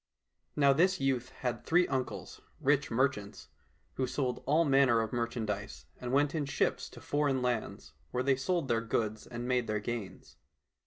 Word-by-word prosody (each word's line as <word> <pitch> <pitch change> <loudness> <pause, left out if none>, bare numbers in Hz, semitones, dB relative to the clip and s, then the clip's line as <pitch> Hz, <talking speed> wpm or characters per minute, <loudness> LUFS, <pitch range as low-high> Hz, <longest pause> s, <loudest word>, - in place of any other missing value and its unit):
Now 140 -1 +5
this 185 +6 +3
youth 130 -2 0
had 120 -2 -4
three 175 +2 +3
uncles, 130 -2 -4 0.2
rich 145 +1 +2
merchants, 115 -4 -1 0.5
who 130 - 0
sold 125 -1 -2
all 155 +4 +4
manner 135 -4 +4
of 110 0 -2
merchandise, 110 -4 -3
and 125 -1 -4
went 145 +1 +3
in 150 -4 -1
ships 135 - 0
to - - -13
foreign 145 -3 0
lands, 120 -3 -2 0.2
where 125 - -1
they 135 0 +3
sold 155 +3 -1
their 115 -2 +1
goods 110 -1 -2
and 120 0 -5
made 125 -2 +1
their 105 0 0
gains. 105 -4 -6
125 Hz, 165 wpm, -31 LUFS, 115-140 Hz, 0.5 s, Now